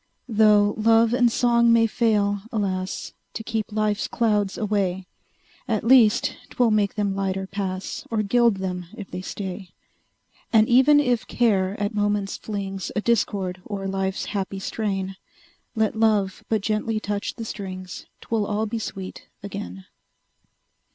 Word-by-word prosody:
Tho' 210 -2 +4
love 225 +1 +4
and 245 -1 +4
song 235 -1 +3
may 230 0 +5
fail, 210 -3 +1
alas! 190 -3 -2 0.2
To 225 - -4
keep 220 -1 -3
life's 210 -1 0
clouds 210 -4 0
away, 195 -3 -1 0.6
At 220 -4 0
least 230 -3 +5
'twill 245 -2 +2
make 210 -2 +1
them 205 -2 0
lighter 195 -1 -1
pass, 190 -1 -4
Or 220 -2 0
gild 235 0 +3
them 180 -2 -4
if 205 -4 -8
they 180 - -5
stay. 190 -1 -6 0.8
And 220 -1 +5
even 265 +4 +6
if 250 -5 +1
Care 200 -5 +1
at 205 +1 -1
moments 205 -1 0
flings 195 -3 -5
A 210 - +1
discord 195 -5 0
o'er 195 -2 -3
life's 190 0 -2
happy 195 -1 -2
strain, 195 -1 -3 0.6
Let 220 0 +1
Love 215 -3 +1
but 220 -2 +1
gently 215 +1 -1
touch 205 0 -3
the 225 - -6
strings, 185 -3 -7
'Twill 220 -3 -1
all 210 +1 0
be 225 +1 -3
sweet 190 -3 -7 0.2
again! 95 - -7
205 Hz, 145 wpm, -24 LUFS, 195-225 Hz, 0.8 s, even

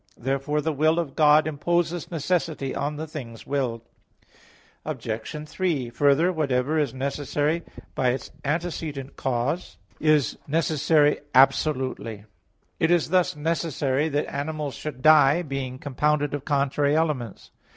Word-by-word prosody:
Therefore 135 +4 -1
the 160 +1 -1
will 155 +3 +2
of 165 -6 -2
God 150 0 +5
imposes 170 +2 -1
necessity 160 -4 -1
on 145 +2 -2
the 155 +2 -4
things 125 -7 -8
willed. 130 -5 -2 1.0
Obj. 115 +7 -5
3: 155 -9 -1
Further, 145 +8 +3
whatever 145 -1 0
is 145 -5 0
necessary 145 +4 -1 0.3
by 130 - +1
its 125 +2 -3
antecedent 150 -3 -3
cause 130 +7 -2 0.2
is 150 -6 +2
necessary 150 -1 +2 0.2
absolutely; 130 -5 +2 0.5
it 160 - +2
is 175 -2 +2
thus 185 -4 +2
necessary 150 -2 0
that 145 0 0
animals 145 0 -4
should 145 -4 -7
die, 155 +1 +6
being 135 -4 -4
compounded 145 +1 0
of 145 -2 -4
contrary 145 0 +1
elements. 150 -9 -2
145 Hz, 125 wpm, -25 LUFS, 135-155 Hz, 1.0 s, die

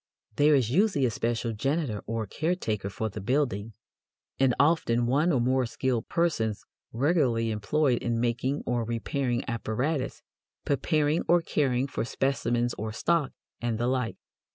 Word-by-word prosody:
There 150 +1 +5
is 120 -4 +1
usually 190 -4 +3
a 120 - +1
special 115 +1 -1
janitor 135 -1 -1
or 115 -1 -2
caretaker 110 - -2
for 110 +2 -3
the 100 - -7
building, 115 -3 0 0.7
and 130 -2 +3
often 140 -6 +3
one 145 +8 +2
or 135 - +2
more 130 +1 +2
skilled 120 0 -2
persons 115 -12 0 0.3
regularly 125 -4 +1
employed 120 +5 +1
in 115 -1 -1
making 120 +4 -1
or 120 -1 0
repairing 120 +2 -1
apparatus, 130 +4 -2 0.4
preparing 150 +2 +1
or 175 0 +4
caring 130 -5 +1
for 140 - -3
specimens 120 -1 0
or 110 +1 -3
stock, 155 +5 +1 0.3
and 120 -2 -1
the 120 - -1
like. 125 -2 -1
125 Hz, 145 wpm, -28 LUFS, 115-145 Hz, 0.7 s, There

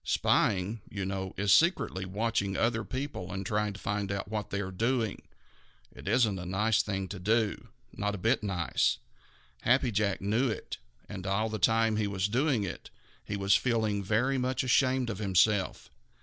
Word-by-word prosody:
Spying, 100 +3 +1
you 100 -2 -4
know, 95 -1 -4
is 100 +1 +3
secretly 155 - +2
watching 100 0 -1
other 115 -1 +1
people 130 -8 -5
and 95 +1 -4
trying 105 +1 0
to 100 - -10
find 100 -1 -2
out 100 0 -3
what 105 0 -4
they 100 - -2
are 95 -1 -4
doing. 115 +2 -1 0.7
It - - -12
isn't 110 -6 +2
a 90 - -6
nice 105 +4 +2
thing 95 -2 -3
to 100 - -6
do, 110 +2 0 0.3
not 105 0 -2
a - - -5
bit 115 +7 +1
nice. 90 -5 0 0.6
Happy 125 0 +3
Jack 100 -2 0
knew 110 +7 +1
it, 110 - -5 0.3
and 95 -2 -7
all 110 +3 0
the 110 0 -4
time 110 +2 +3
he 105 -1 +1
was 100 0 -1
doing 125 +1 +1
it, 95 - -6 0.3
he 105 - -4
was 100 0 +2
feeling 110 -5 +1
very 120 +7 +1
much 130 +1 0
ashamed 130 -1 +2
of 105 - -6
himself. 100 0 +1
105 Hz, 175 wpm, -30 LUFS, 100-115 Hz, 0.7 s, is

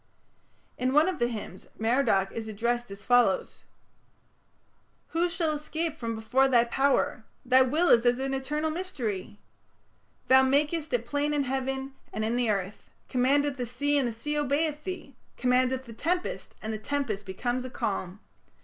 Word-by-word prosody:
" - - -40 0.3
In 255 +1 +1
one 300 +4 +5
of 365 -5 -2
the 240 - +2
hymns 215 -5 -7
Merodach 225 -4 +2
is 225 -1 -5
addressed 235 +2 -1
as 200 0 -10
follows: 245 -5 +2 1.4
Who 340 +2 +1
shall 335 -2 0
escape 310 +1 -3
from 230 -6 -4
before 240 +5 +2
thy 245 -3 +5
power? 265 -1 +1 0.2
Thy 255 +1 +6
will 305 +7 +2
is 230 -1 +6
an 265 +3 +1
eternal 300 +4 -1
mystery! 235 - -4 0.9
Thou 260 0 +7
makest 295 +4 +1
it 240 -2 0
plain 290 +3 0
in 285 - +2
heaven 265 +1 -2 0.2
And 215 - -2
in 225 +2 0
the 245 -2 +1
earth, 195 -1 -3 0.2
Command 270 +3 +3
the 265 -4 -2
sea 285 +5 0
And 265 - +1
the 235 - -3
sea 295 +7 -2
obeyeth 295 +2 0
thee. 365 -8 -6 0.2
Command 250 0 +3
the 260 -3 -5
tempest 350 +10 -2
And 220 0 -3
the 215 - -4
tempest 215 -6 -2
becometh 245 +6 -2
a - - -5
calm. 195 -4 -3
255 Hz, 165 wpm, -28 LUFS, 230-290 Hz, 1.4 s, Thou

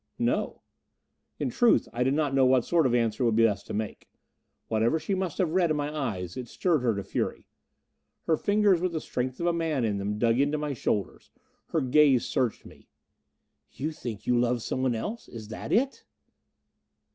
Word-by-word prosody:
"No." - - -1 0.7
In - - -2
truth, 240 -2 +3
I 120 - -3
did 135 +2 +1
not 150 -3 0
know 135 -1 +4
what 130 -2 +3
sort 165 -5 +3
of 120 - +1
answer 115 -1 0
it 125 - +3
would 115 - +2
be 115 - +4
best 100 -3 -1
to - - -6
make. 110 0 -5 0.6
Whatever 115 +7 +2
she 195 - -3
must 185 -4 -2
have 180 -4 +1
read 175 -1 +2
in 155 - +1
my 145 +1 -3
eyes, 100 - -3
it 125 -2 -6
stirred 165 +3 0
her 120 -3 +1
to 100 - -3
fury. - - -3 0.8
Her 160 - +2
fingers 205 0 +2
with 180 -1 -1
the 160 - -1
strength 130 -3 -4
of 170 - -2
a 175 - +2
man 160 -7 0
in 105 -2 -1
them, 105 +1 -2
dug 115 +2 +2
into 145 +2 +2
my 150 -1 -2
shoulders. 105 -4 -2 0.4
Her 160 - 0
gaze 135 -1 +4
searched 125 -4 -1
me. - - -16 0.9
"You 150 +4 -3
think 120 -9 -7
you 125 -1 +2
love 120 -1 +1
someone 130 -2 -1
else? 215 - -5
Is 110 -2 -9
that 110 - -6
it?" 265 +5 +1
130 Hz, 200 wpm, -27 LUFS, 115-160 Hz, 0.9 s, know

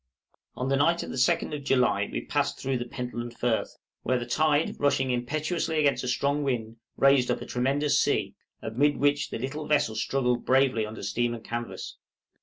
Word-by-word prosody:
On 125 - -3
the 135 0 +2
night 170 +4 +2
of - - -7
the - - -5
2d 130 +3 +1
of 145 - -7
July 125 -7 +2
we - - -4
passed - - 0
through 130 -1 -1
the 120 - -4
Pentland 120 -1 -6
Firth, 120 -2 -1 0.2
where 130 - +1
the 120 - -4
tide 150 +4 +1
rushing 135 -2 +2
impetuously 155 +7 -1
against 145 -3 +2
a - - -3
strong 140 +3 0
wind 115 -5 -2 0.2
raised 135 -2 +4
up - - 0
a - - -7
tremendous 140 +4 +1
sea, - - 0 0.3
amid 140 +7 +1
which 145 0 +1
the - - -4
little 145 +5 -5
vessel 145 -7 +2
struggled 125 +1 0
bravely 130 -4 +2
under 110 -1 -8
steam 120 +4 -1
and 115 - -10
canvas. 120 0 -5
130 Hz, 190 wpm, -27 LUFS, 120-145 Hz, 0.3 s, raised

